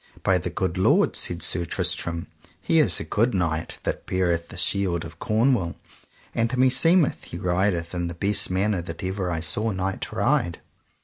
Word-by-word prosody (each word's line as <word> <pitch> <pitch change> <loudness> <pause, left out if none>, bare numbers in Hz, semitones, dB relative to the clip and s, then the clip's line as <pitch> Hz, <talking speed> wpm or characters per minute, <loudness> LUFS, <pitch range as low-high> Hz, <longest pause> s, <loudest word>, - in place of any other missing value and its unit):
By - - +3
the - - -4
good 90 -2 -2
lord, 95 - +3
said 85 0 0
Sir 85 - +1
Tristram, 85 -3 -2 0.3
he 165 - +2
is 155 - +5
a - - -4
good 115 +1 0
knight 80 -3 -1
that - - -4
beareth 85 -2 0
the - - -9
shield 90 -4 +1
of 85 +1 -11
Cornwall, 110 -5 +1 0.6
and 115 0 0
meseemeth 145 +6 +3
he 85 - -8
rideth 90 -1 0
in 85 -1 -2
the 85 - -6
best 100 +4 +2
manner 95 0 0
that 85 +2 -8
ever 95 0 -2
I 80 -2 -2
saw 105 +8 +1
knight 95 -1 -3
ride. 85 0 0
90 Hz, 175 wpm, -24 LUFS, 85-105 Hz, 0.6 s, is